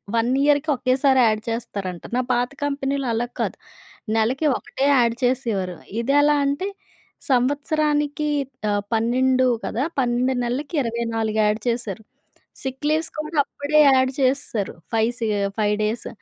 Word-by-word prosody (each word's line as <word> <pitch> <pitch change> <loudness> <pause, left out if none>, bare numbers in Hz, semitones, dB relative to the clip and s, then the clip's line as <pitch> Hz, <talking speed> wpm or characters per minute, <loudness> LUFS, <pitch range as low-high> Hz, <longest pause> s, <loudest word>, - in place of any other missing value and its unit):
One 230 +1 +2
ఇయర్‌కి 290 +1 +3
ఒకేసారి 260 +1 +3
add 215 0 +1
చేస్తారంట. 200 -6 -4
నా - - +3
పాత 245 0 +1 0.2
కంపెనీలో 280 -1 -1
అలా 235 +2 -1
కాదు. - - -2 0.6
నెలకి 255 +8 +1
ఒకటే 270 - -3
యాడ్ 235 -3 +3
చేసేవారు. 225 -8 0 0.2
ఇదెలా 290 +4 +3
అంటే 285 +7 -1 0.6
సంవత్సరానికి 295 +3 +1 0.4
ఆహ్, 205 0 0
12 255 +3 +2 0.2
కదా! 240 - -1 0.2
12 250 +1 +1
నెలలకి 280 +6 -3
24 225 -2 -2
యాడ్ 210 +1 +1
చేశారు. 225 -3 -3 0.6
సిక్ 265 +2 -5
లీవ్స్ 315 +1 +1
కూడా 305 +1 -4
అప్పుడే 290 +2 0
యాడ్ 260 -1 +4
చేసేసారు. 260 -6 0 0.2
5 225 0 +3
సీ 230 - -1 0.3
5 210 -1 +2
డేస్. 215 +3 -2
255 Hz, 130 wpm, -22 LUFS, 225-280 Hz, 0.6 s, యాడ్